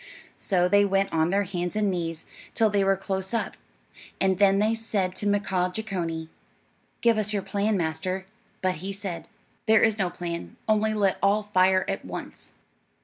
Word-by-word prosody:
So 180 Hz, -2 st, +2 dB
they 205 Hz, +2 st, +5 dB
went 195 Hz, 0 st, +1 dB
on 160 Hz, 0 st, +2 dB
their 200 Hz, +2 st, +2 dB
hands 180 Hz, -1 st, -3 dB
and 210 Hz, -2 st, +2 dB
knees 165 Hz, -3 st, -3 dB, 0.3 s
till 220 Hz, -2 st, +3 dB
they 200 Hz, -1 st, +2 dB
were 195 Hz, 0 st, +3 dB
close 190 Hz, +2 st, -3 dB
up, 230 Hz, -, -1 dB, 0.6 s
and 190 Hz, -1 st, +2 dB
then 195 Hz, -1 st, +5 dB
they 215 Hz, +2 st, +3 dB
said 210 Hz, -5 st, -1 dB
to 205 Hz, -, -2 dB
Mkaaah 190 Hz, -3 st, 0 dB
Jeechonee, 170 Hz, -7 st, -3 dB, 0.7 s
"Give 230 Hz, -2 st, +4 dB
us 210 Hz, 0 st, 0 dB
your 200 Hz, -2 st, -1 dB
plan, 205 Hz, +1 st, 0 dB
master;" 185 Hz, +3 st, -2 dB, 0.4 s
but 185 Hz, -2 st, +1 dB
he 195 Hz, +1 st, -3 dB
said, 195 Hz, -4 st, -5 dB, 0.4 s
"There 220 Hz, 0 st, +6 dB
is 220 Hz, -1 st, +3 dB
no 185 Hz, -2 st, +1 dB
plan, 170 Hz, -1 st, -5 dB
only 215 Hz, 0 st, +2 dB
let 200 Hz, -2 st, +1 dB
all 205 Hz, +2 st, +3 dB
fire 185 Hz, -2 st, +3 dB
at 195 Hz, 0 st, -2 dB
once." -, -, -7 dB
195 Hz, 175 wpm, -26 LUFS, 180-205 Hz, 0.7 s, There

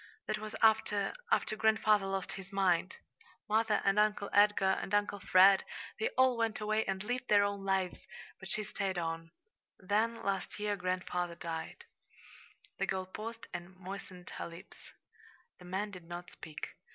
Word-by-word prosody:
That -, -, -2 dB
was 215 Hz, 0 st, -6 dB
after 215 Hz, -2 st, +3 dB, 0.2 s
after 470 Hz, -, +2 dB
grandfather 215 Hz, -2 st, +3 dB
lost 195 Hz, -2 st, -2 dB
his 190 Hz, -1 st, -8 dB
mind. 185 Hz, -2 st, +2 dB, 0.5 s
Mother 220 Hz, 0 st, +2 dB
and 195 Hz, +1 st, +4 dB
Uncle 210 Hz, -1 st, +2 dB
Edgar 205 Hz, -2 st, +5 dB
and 200 Hz, -, -1 dB
Uncle 205 Hz, 0 st, +1 dB
Fred 190 Hz, +1 st, +6 dB, 0.4 s
they 450 Hz, -, +1 dB
all 260 Hz, -2 st, +5 dB
went 225 Hz, -1 st, 0 dB
away 215 Hz, +1 st, +1 dB
and 190 Hz, 0 st, -2 dB
lived 245 Hz, +3 st, -2 dB
their 205 Hz, -1 st, +6 dB
own 200 Hz, -1 st, -2 dB
lives, 195 Hz, -2 st, -1 dB, 0.3 s
but 190 Hz, -, -9 dB
she 215 Hz, -, 0 dB
stayed 195 Hz, -2 st, -2 dB
on. 165 Hz, -1 st, -3 dB, 0.5 s
Then 220 Hz, +4 st, 0 dB
last 195 Hz, -1 st, -2 dB
year 210 Hz, 0 st, 0 dB
grandfather 180 Hz, -2 st, -2 dB
died." 165 Hz, -1 st, -6 dB, 0.9 s
The -, -, 0 dB
girl 190 Hz, -1 st, -1 dB
paused 225 Hz, +4 st, -7 dB
and 175 Hz, +1 st, -7 dB
moistened 185 Hz, -1 st, -9 dB
her -, -, -3 dB
lips. 170 Hz, +3 st, -13 dB, 0.7 s
The 180 Hz, -, -13 dB
man 195 Hz, +3 st, -2 dB
did 180 Hz, -3 st, -10 dB
not 175 Hz, +1 st, -7 dB
speak. 155 Hz, -2 st, -7 dB
195 Hz, 160 wpm, -33 LUFS, 185-215 Hz, 0.9 s, Fred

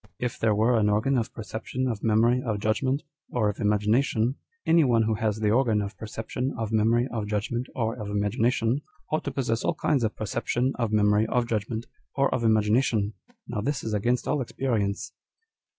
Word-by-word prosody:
If 125 Hz, -1 st, -3 dB
there 110 Hz, -2 st, +2 dB
were 115 Hz, +2 st, +3 dB
an 105 Hz, -1 st, +3 dB
organ 110 Hz, +7 st, +2 dB
of 115 Hz, -, -3 dB
perception, 115 Hz, +3 st, -4 dB
of 115 Hz, -5 st, -3 dB
memory, 115 Hz, +3 st, +3 dB
of 110 Hz, -5 st, -2 dB
judgment, 130 Hz, +7 st, 0 dB, 0.3 s
or 110 Hz, -4 st, +1 dB
of 105 Hz, -, -5 dB
imagination, 110 Hz, +3 st, +2 dB, 0.3 s
any 165 Hz, 0 st, +5 dB
one 120 Hz, -4 st, +3 dB
who 110 Hz, 0 st, +1 dB
has 110 Hz, -1 st, -1 dB
the 105 Hz, -1 st, +2 dB
organ 115 Hz, -3 st, +3 dB
of 100 Hz, 0 st, -4 dB
perception, 110 Hz, +4 st, -4 dB
of 115 Hz, -2 st, -3 dB
memory, 115 Hz, +3 st, +3 dB
of 110 Hz, -3 st, -3 dB
judgment, 110 Hz, +4 st, -2 dB
or 115 Hz, -2 st, 0 dB
of 105 Hz, -, -5 dB
imagination, 115 Hz, +5 st, +1 dB, 0.3 s
ought 155 Hz, -, 0 dB
to 140 Hz, -, -2 dB
possess 120 Hz, -4 st, -1 dB
all -, -, 0 dB
kinds 140 Hz, -6 st, +1 dB
of 110 Hz, -, -1 dB
perception, 120 Hz, +4 st, -1 dB
of 115 Hz, -3 st, 0 dB
memory, 105 Hz, 0 st, +3 dB
of 120 Hz, +1 st, +1 dB
judgment, 110 Hz, +1 st, -2 dB, 0.3 s
or 140 Hz, 0 st, +2 dB
of 120 Hz, -, -1 dB
imagination. 110 Hz, -1 st, +2 dB, 0.3 s
Now 115 Hz, -4 st, -3 dB
this 140 Hz, +4 st, -2 dB
is 110 Hz, -, -3 dB
against 120 Hz, +4 st, 0 dB
all 145 Hz, -, +1 dB
experience." 115 Hz, -6 st, -2 dB
115 Hz, 185 wpm, -26 LUFS, 105-125 Hz, 0.3 s, any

